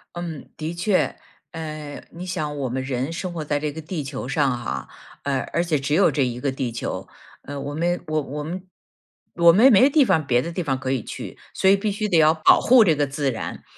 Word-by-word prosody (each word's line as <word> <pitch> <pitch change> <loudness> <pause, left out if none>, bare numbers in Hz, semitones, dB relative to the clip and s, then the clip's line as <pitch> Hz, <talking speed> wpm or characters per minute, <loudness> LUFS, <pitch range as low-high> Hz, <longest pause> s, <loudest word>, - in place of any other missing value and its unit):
嗯， 170 -4 -6
的 160 +2 -4
确。 185 +3 +1 0.4
嗯， 155 -3 -7
你 175 +3 -8
想 155 -5 -3
我 135 -2 -2
们 130 +2 -2
人 130 +2 -2
生 175 +1 -4
活 165 -2 -4
在 150 -1 -1
这 150 0 -2
个 160 +2 -7
地 155 -1 -4
球 135 -2 -6
上 135 -2 +1
哈， 65 - -4 0.3
呃， 140 -2 0
而 170 - +2
且 160 -4 0
只 140 +2 -2
有 195 - +4
这 140 - +1
一 125 -1 -2
个 135 +1 -1
地 130 -3 -3
球， 115 - -5 0.4
嗯， 140 0 -6
我 145 - -5
们 175 +3 -1
我 155 0 0
我 150 +1 -5
们 180 +4 -6 0.7
我 170 0 +7
们 245 +8 +7
没 250 +6 +6
地 290 0 +5
方 155 -8 +1
别 120 -1 +3
的 170 - -5
地 180 - -3
方 135 -6 -1
可 130 0 -3
以 130 - 0
去。 - - -8
所 190 - +1
以 195 - +7
必 205 +1 -1
须 210 +1 -2
得 170 - +3
要 155 0 +6
保 160 -1 +5
护 245 -1 +6
这 165 -7 +3
个 145 0 +1
自 135 0 -1
然， 115 - -6
155 Hz, 255 characters per minute, -23 LUFS, 140-175 Hz, 0.7 s, 我